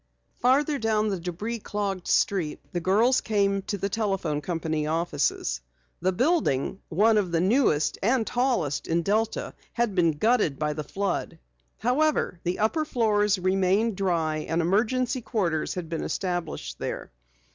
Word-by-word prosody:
Farther 280 Hz, +3 st, +3 dB
down 215 Hz, -1 st, +1 dB
the 195 Hz, -3 st, -2 dB
debris 185 Hz, +7 st, -4 dB
clogged 200 Hz, -3 st, -3 dB
street 175 Hz, -7 st, +1 dB
the 175 Hz, -, 0 dB
girls 215 Hz, +9 st, +3 dB
came 200 Hz, -2 st, +1 dB
to 200 Hz, +1 st, -4 dB
the 200 Hz, -, -1 dB
telephone 195 Hz, -8 st, -1 dB
company 160 Hz, -2 st, -2 dB
offices. 155 Hz, -, -1 dB, 0.4 s
The 185 Hz, +2 st, +1 dB
building, 215 Hz, -, +1 dB
one 215 Hz, +6 st, +4 dB
of 185 Hz, -4 st, -2 dB
the 165 Hz, -, +2 dB
newest 180 Hz, -, +2 dB
and 235 Hz, +3 st, +2 dB
tallest 240 Hz, -, 0 dB
in 170 Hz, +1 st, +1 dB
Delta, 215 Hz, +4 st, 0 dB, 0.2 s
had 235 Hz, -3 st, 0 dB
been 170 Hz, -4 st, +3 dB
gutted 215 Hz, -, +2 dB
by 150 Hz, 0 st, -1 dB
the 150 Hz, 0 st, -4 dB
flood. 195 Hz, -2 st, -3 dB, 0.4 s
However, 250 Hz, -, +1 dB
the 175 Hz, +1 st, -2 dB
upper 225 Hz, +9 st, +1 dB
floors 210 Hz, -7 st, +2 dB
remained 190 Hz, +4 st, +2 dB
dry 170 Hz, -5 st, 0 dB
and 165 Hz, +2 st, -2 dB
emergency 240 Hz, -, +1 dB
quarters 180 Hz, -9 st, -1 dB
had 180 Hz, -3 st, -4 dB
been 165 Hz, 0 st, -3 dB
established 175 Hz, -2 st, -3 dB
there. -, -, -5 dB
195 Hz, 145 wpm, -26 LUFS, 170-225 Hz, 0.4 s, one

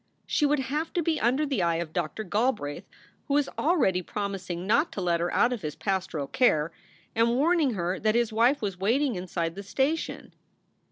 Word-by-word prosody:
She 295 Hz, -, +2 dB
would 295 Hz, +1 st, +2 dB
have 300 Hz, +5 st, -2 dB
to 345 Hz, -, 0 dB
be 315 Hz, -1 st, 0 dB
under 260 Hz, +6 st, +2 dB
the 275 Hz, -9 st, -1 dB
eye 170 Hz, -1 st, +2 dB
of 165 Hz, -1 st, -4 dB
Doctor 175 Hz, +5 st, -2 dB
Galbraith, 210 Hz, -, -1 dB, 0.4 s
who 280 Hz, -, +1 dB
was 290 Hz, -1 st, +3 dB
already 285 Hz, -, +2 dB
promising 185 Hz, -2 st, -4 dB
not 285 Hz, -, +2 dB
to -, -, -4 dB
let 175 Hz, -2 st, +1 dB
her 175 Hz, +1 st, -1 dB
out 245 Hz, +1 st, +3 dB
of 235 Hz, -, -5 dB
his 150 Hz, -3 st, -4 dB
pastoral 190 Hz, -7 st, -2 dB
care, 155 Hz, -, +2 dB, 0.4 s
and 230 Hz, +1 st, +2 dB
warning 300 Hz, -2 st, +2 dB
her 180 Hz, 0 st, -2 dB
that 215 Hz, +1 st, +1 dB
his 235 Hz, -2 st, +1 dB
wife 235 Hz, +4 st, +3 dB
was 195 Hz, -3 st, -3 dB
waiting 250 Hz, +7 st, +2 dB
inside 175 Hz, -3 st, -3 dB
the 200 Hz, -, -7 dB
station. 270 Hz, +10 st, -2 dB
215 Hz, 190 wpm, -27 LUFS, 180-275 Hz, 0.4 s, was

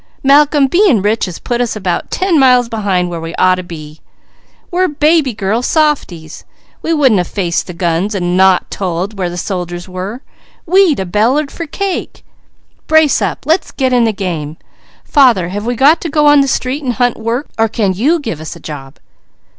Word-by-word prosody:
Malcolm, 285 Hz, +1 st, +4 dB
being 320 Hz, -, +3 dB
rich 215 Hz, +2 st, +1 dB
has 180 Hz, -3 st, -7 dB
put 240 Hz, 0 st, -3 dB
us 240 Hz, -2 st, -2 dB
about 185 Hz, -4 st, -3 dB
ten 370 Hz, -4 st, +1 dB
miles 250 Hz, -2 st, +4 dB
behind 200 Hz, -6 st, -1 dB
where 170 Hz, -2 st, -6 dB
we 165 Hz, +1 st, -6 dB
ought 185 Hz, 0 st, +3 dB
to 185 Hz, -, -3 dB
be. 155 Hz, -3 st, -10 dB, 0.7 s
We're 365 Hz, +1 st, +1 dB
baby 300 Hz, -2 st, +2 dB
girl 205 Hz, +4 st, -1 dB
softies! 250 Hz, -, -1 dB, 0.4 s
We 330 Hz, -, -2 dB
wouldn't 265 Hz, -, +3 dB
a -, -, +1 dB
faced 175 Hz, -1 st, -2 dB
the 180 Hz, -, -8 dB
guns 175 Hz, +4 st, -1 dB
and 175 Hz, -2 st, -1 dB
not 190 Hz, -1 st, +3 dB
told 185 Hz, +2 st, -3 dB
where 180 Hz, -2 st, -1 dB
the 175 Hz, -, -7 dB
soldiers 175 Hz, -2 st, -5 dB
were, 190 Hz, +7 st, -6 dB, 0.4 s
we'd 365 Hz, -, +3 dB
a 190 Hz, -, -2 dB
bellered 240 Hz, +10 st, 0 dB
for 335 Hz, -, -6 dB
cake. 390 Hz, +4 st, -4 dB, 0.6 s
Brace 315 Hz, -3 st, +3 dB
up! -, -, -3 dB
Let's 320 Hz, +5 st, +1 dB
get 260 Hz, -2 st, -1 dB
in 245 Hz, -2 st, +3 dB
the 225 Hz, -, +1 dB
game! 165 Hz, -7 st, -5 dB, 0.5 s
Father, 240 Hz, -, +3 dB
have 205 Hz, +4 st, -5 dB
we 245 Hz, -, -1 dB
got 290 Hz, +7 st, +4 dB
to 335 Hz, -, -4 dB
go 300 Hz, 0 st, +1 dB
on 290 Hz, -1 st, +6 dB
the 275 Hz, -, +1 dB
street 260 Hz, +2 st, -2 dB
and 250 Hz, -2 st, -1 dB
hunt 245 Hz, -1 st, 0 dB
work, 230 Hz, +5 st, -2 dB
or 225 Hz, -, +3 dB
can 210 Hz, -3 st, -1 dB
you 285 Hz, -, +1 dB
give 220 Hz, -, -5 dB
us 160 Hz, +3 st, -7 dB
a -, -, -12 dB
job?" 140 Hz, -3 st, -9 dB
225 Hz, 195 wpm, -14 LUFS, 180-285 Hz, 0.7 s, on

